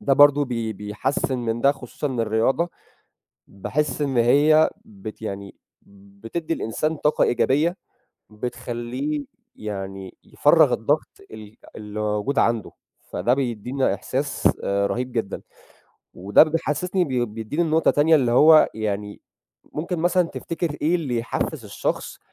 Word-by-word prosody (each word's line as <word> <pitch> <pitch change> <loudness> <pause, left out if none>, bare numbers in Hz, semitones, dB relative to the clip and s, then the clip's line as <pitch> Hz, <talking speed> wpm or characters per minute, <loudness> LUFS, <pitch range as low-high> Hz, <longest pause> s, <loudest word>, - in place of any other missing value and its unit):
ده 140 - +1
برضه 145 +1 +6
بي 115 -4 -3
بيحسِّن 105 +6 -2
من 115 -1 -2
ده 140 +2 +4
خصوصًا 135 +2 -6
إن 130 -4 -2
الرياضة 115 +10 +1 0.8
باحس 140 +8 -2
إن 135 -4 0
هي 145 +6 +5 0.2
بت 105 +2 -10
يعني 100 -2 -6 0.7
بتدّي 165 +8 -3
الإنسان 155 +8 -2
طاقة 150 - +2
إيجابية 150 +8 +2 0.5
بتخلّيه 125 +6 -4 0.3
يعني 95 -2 -6
يفرَّغ - - +4
الضغط - - 0 0.2
ال 110 0 -11 0.2
اللي 105 0 -7
موجود 105 +6 0
عنده، 115 -3 +1 0.4
فده 120 - +1
بيدّينا 125 0 -1
إحساس 135 +1 -1
آآ 100 0 +1
رهيب 125 +1 -3
جدًا. 110 -5 -3 0.7
وده 100 +8 +5
ب 155 - +3
بيحسّسني 175 +3 0
بي 125 -4 0
بيدّيني 115 +9 -3
لنقطة 160 0 +3
تانية 155 +3 +4
اللي 125 -4 +1
هو 155 +5 +7
يعني 105 -1 -4 0.5
ممكن 170 +3 -3
مثلًا 175 +2 +3
تفتكر 165 -2 -4
إيه 160 +4 +2
اللي 140 -9 -1
يحفّز 115 - -3
الشخص - - -3
125 Hz, 130 wpm, -23 LUFS, 110-150 Hz, 0.8 s, هو